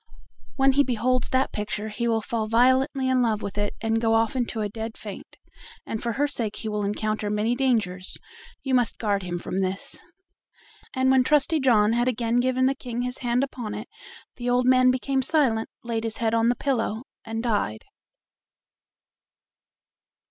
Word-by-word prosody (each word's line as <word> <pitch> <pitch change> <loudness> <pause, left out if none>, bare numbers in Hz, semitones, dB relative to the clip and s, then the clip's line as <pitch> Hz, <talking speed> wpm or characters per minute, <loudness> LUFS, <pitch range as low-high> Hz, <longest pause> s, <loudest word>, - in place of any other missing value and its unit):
When 270 0 +4
he 285 +2 +4
beholds 255 0 0
that 260 +1 +1
picture 210 +1 -3
he 235 +3 -2
will 225 -1 +1
fall 225 -1 -2
violently 260 +4 +3
in 260 -1 +3
love 220 -3 0
with 200 - -5
it 205 0 -2
and 225 0 0
go 225 -1 +3
off 225 +2 +1
into 240 -3 -1
a 210 - 0
dead 220 +2 -6
faint, 205 -3 -9 0.5
and 220 - -4
for 235 -1 -2
her 290 +4 +1
sake 230 -7 -3
he 220 - -5
will 210 -1 -2
encounter 210 +1 -1
many 210 +3 +1
dangers; 220 -8 -1 0.5
you 270 - -2
must 245 -2 +2
guard 205 -3 0
him 175 -1 -4
from 180 +2 -4
this." 190 0 -3 0.9
And 260 0 +3
when 260 -1 +5
Trusty 300 +3 +3
John 225 -5 +4
had 240 +1 +1
again 235 -1 0
given 255 +1 +2
the 265 - +3
King 245 -2 -5
his 250 +1 -4
hand 245 0 +1
upon 240 -6 -5
it 215 +3 -6 0.5
the 245 0 -2
old 245 0 +2
man 255 0 +5
became 265 +1 +1
silent, 260 -6 +2
laid 230 -1 -2
his 225 -1 -4
head 225 -1 0
on 230 0 +3
the 245 - +2
pillow, 230 -4 -1 0.2
and 225 +1 -4
died. 205 - -1
235 Hz, 180 wpm, -25 LUFS, 215-255 Hz, 0.9 s, when